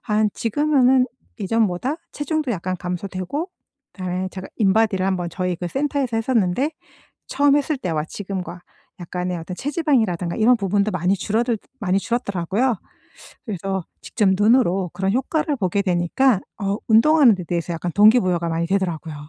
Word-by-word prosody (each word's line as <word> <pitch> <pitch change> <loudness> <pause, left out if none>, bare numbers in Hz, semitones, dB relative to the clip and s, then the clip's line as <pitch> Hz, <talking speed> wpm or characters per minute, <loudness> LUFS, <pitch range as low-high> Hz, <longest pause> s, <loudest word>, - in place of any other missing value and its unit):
한 215 -1 +1
지금은 260 +1 +3 0.3
이전보다 220 - 0 0.2
체중도 300 -2 -2
약간 185 -1 -3
감소되고 185 - -4 0.4
그다음에 185 0 -3
제가 185 0 -7
인바디를 205 -2 +2
한번 180 -2 -1
저희 180 0 -2
그 175 +1 -4
센터에서 270 -1 -1
했었는데 225 - +1 0.6
처음 285 0 +3
했을 295 +1 0
때와 165 - -2
지금과 185 -1 -6 0.4
약간의 180 +1 -3
어떤 170 +2 -7
체지방이라든가 235 - 0
이런 235 +2 +4
부분도 200 0 +1
많이 180 +1 +1
줄어들 225 +4 -1 0.2
많이 195 -3 +1
줄었더라고요. 220 +1 -1 0.7
그래서 190 -3 -3 0.2
직접 210 -4 0
눈으로 200 -4 +3
그런 190 +1 -1
효과를 295 +5 0
보게 200 -3 0
되니까 190 +6 +2 0.2
어 200 0 0
운동하는 245 +2 +6
데 180 - -6
대해서 170 0 -2
약간 170 +1 -4
동기부여가 190 -5 +4
많이 165 +1 -1
되더라고요. 170 -4 -2
200 Hz, 375 characters per minute, -22 LUFS, 180-245 Hz, 0.7 s, 운동하는